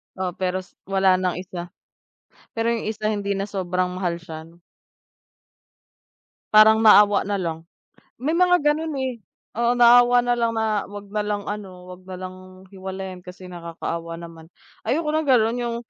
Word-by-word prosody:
Oo, 185 -1 -2
pero 185 0 -1
s - - -23 0.2
wala 190 -1 +3
ng 180 -2 -1
isa, 180 -1 -7 0.9
pero 225 0 0
yung, 230 -2 -2
isa 215 0 -2
hindi 200 -1 -2
na 195 +1 -4
sobrang 185 -1 -1
mahal 170 -2 -2
siya 160 -1 -9
no. 170 +1 -20 1.9
Parang 220 +1 +7
naawa 205 -1 +6
nalang. 170 -5 -3 0.6
May 305 +6 0
mga 360 -1 +4
gano'n 300 +2 0
eh, 260 -1 -1 0.4
oo, 235 +1 +2
naawa 245 0 +6
nalang 240 -1 0
na 220 -2 0
'wag 205 0 -9
nalang 210 0 -2
ano, 190 -3 -7
'wag 180 0 -11
nalang 185 0 -10
hiwalayan 190 -1 -7
kasi 180 0 -11
nakakaawa 170 -1 -6
naman. 165 -1 -11 0.4
Ayoko 310 +3 0
ng 310 0 0
gano'n, 235 -2 +3
yung 240 -1 -2
195 Hz, 145 wpm, -23 LUFS, 180-230 Hz, 1.9 s, Parang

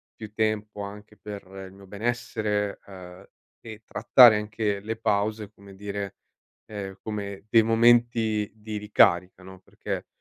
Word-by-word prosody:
più 110 -2 -9
tempo 110 -2 -2
anche 105 +1 -10
per 105 -1 -8 0.2
il 95 - -15
mio 100 0 -15
benessere, 105 -1 -2
ehm, 90 -2 -12 0.3
e 110 -1 -11
trattare 120 -2 +6
anche 105 -1 -2
le 110 +3 -5
pause, 105 -1 -1
come 100 -2 -16
dire, 100 0 -5 0.5
ehm, 100 -2 -7
come 100 -2 -6
dei 115 -1 +6
momenti 115 -2 +3
di 105 0 -6
ricarica, 95 -3 +2
no. 95 0 -12
Perché, - - -6
105 Hz, 135 wpm, -26 LUFS, 100-110 Hz, 0.5 s, trattare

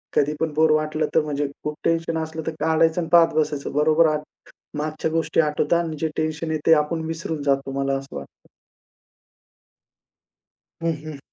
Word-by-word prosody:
कधीपण 150 +2 +1
बोर 155 +1 +4
वाटलं 155 0 +1
तर 160 - +6
म्हणजे, 145 -1 -2 0.2
खूप 150 0 -3
टेन्शन 165 0 0
असलं 160 0 -6
तर - - 0
काढायचं 160 +2 +2
आणि 165 - -5
पाहत 170 -1 +6
बसायचं. 150 -2 -1
बरोबर 155 +2 +4
आठ 150 - -4 0.6
मागच्या 155 +1 -2
गोष्टी 165 0 +1
आठवतात 150 +2 +1
आणि 160 -2 -4
जे 160 - +1
टेन्शन 155 +1 -2
आहे 155 - 0
ते 165 - +6
आपण 160 +1 -3
विसरून 160 -2 -4
जातो, 135 -1 0
मला 135 0 0
असं 135 - -10
वाटतं. 70 0 -11 2.3
हं, 165 0 +1
हं. 155 -2 -7
155 Hz, 165 wpm, -23 LUFS, 150-160 Hz, 2.3 s, तर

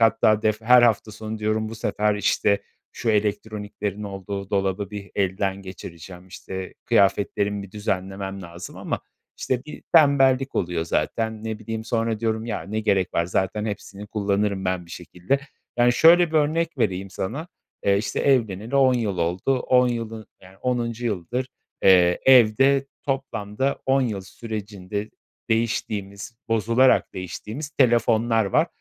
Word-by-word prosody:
hatta 110 -1 +4
def 110 0 +1
her 125 +2 +6
hafta 110 -2 +2
sonu 110 0 -6
diyorum: 110 0 -1
"Bu 115 - -7
sefer, 105 -1 0
işte, 105 0 +1 0.3
şu 115 - -1
elektroniklerin 105 -1 -2
olduğu 100 0 -6
dolabı 100 0 -1
bir 100 -1 -8
elden 95 0 -1
geçireceğim, 90 -1 -10
işte, 95 +1 -7
kıyafetlerimi 100 +1 +2
bir 100 - -11
düzenlemem 95 -1 -4
lazım." 85 +1 -9
Ama, - - -3 0.4
işte, 130 +1 -2
bir 150 - -10
tembellik 135 -4 +5
oluyor 85 -2 -1
zaten. 110 +5 -2
Ne 110 -1 -3
bileyim, 110 0 -5
sonra 115 -1 -1
diyorum: 110 0 -1
"Ya, 110 - -3
ne 110 +2 -3
gerek 95 -4 +1
var. 85 - +2
Zaten 95 +4 -1
hepsini 100 -1 -6
kullanırım 100 -2 -1
ben 90 -2 -1
bir - - -16
şekilde." 95 +11 -2 0.4
Yani, 120 0 +4
şöyle 170 +6 +6
bir 160 - 0
örnek 155 +1 +1
vereyim 95 -4 -1
sana, 135 - -4 0.4
eee, 100 0 +4
işte, 105 - -2
evleneli 115 -2 +1
10 130 -2 +5
yıl 110 -6 -1
oldu. 90 +10 0
10 125 -1 +3
yılı, 115 -2 -4
yani, 95 +1 -16
10'uncu 120 -1 -2
yıldır, 115 +6 -2 0.3
eee, 90 -2 +5
evde 135 +3 +5 0.2
toplamda 135 -2 -2
10 135 +1 +3
yıl 105 -6 -2
sürecinde 105 -1 -6 0.4
değiştiğimiz, 110 -1 -2
bozularak 115 +4 +3
değiştiğimiz 105 - -6
telefonlar 115 -3 +3
var 100 - +2
105 Hz, 145 wpm, -24 LUFS, 100-120 Hz, 0.4 s, her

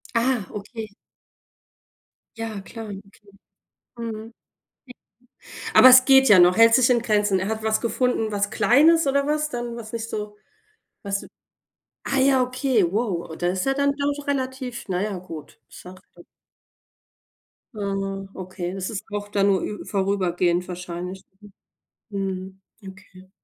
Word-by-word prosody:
Ah, 235 -2 +1
okay. 215 +2 -7 1.5
Ja, 225 -3 -5
klar, 225 +3 -9
okay, 200 -2 -8 1.0
mhm. 225 -1 -6 1.4
Aber 255 - +9
es 255 0 +8
geht 265 -1 +6
ja 200 -3 +8
noch, 180 +2 +5
hält 230 0 +7
sich 255 0 +4
in 240 -2 +3
Grenzen. 210 -4 +1
Er 190 - -3
hat 220 0 -3
was 220 0 +1
gefunden, 235 -2 0
was 205 0 -1
Kleines 285 +10 +4
oder 280 +1 +1
was 300 0 0
dann 240 -2 -5
was 225 -2 -9
nicht 230 0 -4
so 210 -1 -5 0.7
was 200 0 -3 0.8
ah 275 - -1
ja, 265 0 +4
okay, 255 -4 +1
wow. 200 -6 -2
Oh, 160 - -7
da 175 - -2
ist 185 0 -2
er 270 - +2
dann 280 +1 +1
doch 285 0 -3
relativ 260 -3 -3
na 185 -2 -1
ja, 205 -2 -2
gut. 165 -5 -10
Sachte. 185 +1 -14 1.5
Ah, 195 -1 -3
okay, 185 -1 -6
es 190 0 -4
ist 215 -4 -6
auch 205 0 -4
dann 200 -1 +1
nur 195 -2 +2
ü 210 - -5
vorübergehend 180 -3 0
wahrscheinlich. 180 +1 -7 0.9
Mhm. 190 -1 -5 0.2
Mhm. 195 - -9
Okay. 190 -1 -18
210 Hz, 145 wpm, -23 LUFS, 190-245 Hz, 1.5 s, Aber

